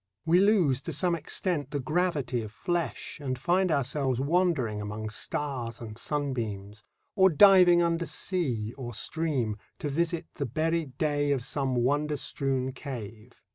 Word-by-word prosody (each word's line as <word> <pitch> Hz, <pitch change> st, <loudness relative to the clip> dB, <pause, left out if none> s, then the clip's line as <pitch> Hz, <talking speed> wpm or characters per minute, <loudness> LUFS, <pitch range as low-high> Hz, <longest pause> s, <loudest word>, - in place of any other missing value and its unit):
We 170 Hz, +2 st, +5 dB
lose 185 Hz, -, +3 dB
to 165 Hz, -, -5 dB
some 175 Hz, +5 st, +1 dB
extent 165 Hz, -2 st, -1 dB
the 145 Hz, -, -2 dB
gravity 150 Hz, -4 st, 0 dB
of 110 Hz, -2 st, -7 dB
flesh 175 Hz, +5 st, -3 dB
and 130 Hz, -2 st, -2 dB
find 175 Hz, +7 st, +1 dB
ourselves 135 Hz, -2 st, 0 dB
wandering 140 Hz, -, +1 dB
among 105 Hz, +1 st, -5 dB
stars 120 Hz, -1 st, -3 dB
and 110 Hz, -2 st, -8 dB
sunbeams, 110 Hz, -7 st, -3 dB, 0.3 s
or 190 Hz, -2 st, +6 dB
diving 180 Hz, 0 st, +7 dB
under 170 Hz, 0 st, 0 dB
sea 125 Hz, -, -1 dB
or 120 Hz, -3 st, -6 dB
stream 130 Hz, -5 st, -1 dB, 0.2 s
to 150 Hz, -, -3 dB
visit 170 Hz, +3 st, -1 dB
the 140 Hz, -, -3 dB
buried 155 Hz, 0 st, -1 dB
day 145 Hz, -2 st, +1 dB
of 135 Hz, -4 st, 0 dB
some 135 Hz, 0 st, -1 dB
wonder 145 Hz, +5 st, +1 dB
strewn 135 Hz, -2 st, -1 dB
cave. 120 Hz, -4 st, -9 dB
140 Hz, 145 wpm, -28 LUFS, 120-165 Hz, 0.3 s, diving